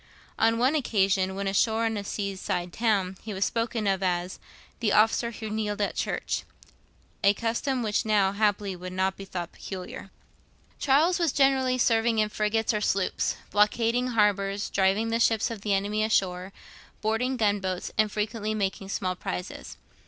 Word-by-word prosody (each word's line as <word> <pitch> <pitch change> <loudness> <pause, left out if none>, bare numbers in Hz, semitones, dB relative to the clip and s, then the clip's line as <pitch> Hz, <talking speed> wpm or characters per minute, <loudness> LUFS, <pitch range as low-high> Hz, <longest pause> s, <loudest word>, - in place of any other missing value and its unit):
On 225 +1 +3
one 255 +5 +3
occasion, 195 -9 +1
when 200 +1 -3
ashore 220 +3 +2
in 225 -1 0
a 205 - -3
seaside 195 -3 -3
town, 195 -5 0
he 215 -3 -6
was 195 +1 +1
spoken 230 -1 -1
of 195 -1 +1
as 180 -1 -1 0.4
'the 225 -3 +1
officer 225 +2 +3
who 220 -1 -7
kneeled 210 -1 -2
at 205 - 0
church;' - - -2 0.8
a 200 +1 +5
custom 235 +3 -1
which 210 +1 0
now 210 -3 +3
happily 205 -1 0
would 180 +1 -7
not 190 +1 0
be 195 - -9
thought 175 -2 -5
peculiar. 190 0 -8 0.7
Charles 310 +7 +3
was 335 -4 +2
generally 265 -2 +3
serving 230 -2 +2
in 215 -1 +2
frigates 215 +2 0
or 210 - -1
sloops; 195 -2 0 0.2
blockading 230 +4 +2
harbours, 205 -3 +1
driving 195 +4 +2
the 230 - +1
ships 225 -1 +2
of 220 -3 -6
the 205 -1 +1
enemy 205 +2 0
ashore, 190 -3 0 0.5
boarding 225 +4 0
gun 205 -3 +2
boats, 185 -2 -3
and 215 -1 +2
frequently 215 0 -2
making 195 -1 -2
small 185 -2 -1
prizes. 90 - -6
210 Hz, 165 wpm, -27 LUFS, 195-225 Hz, 0.8 s, a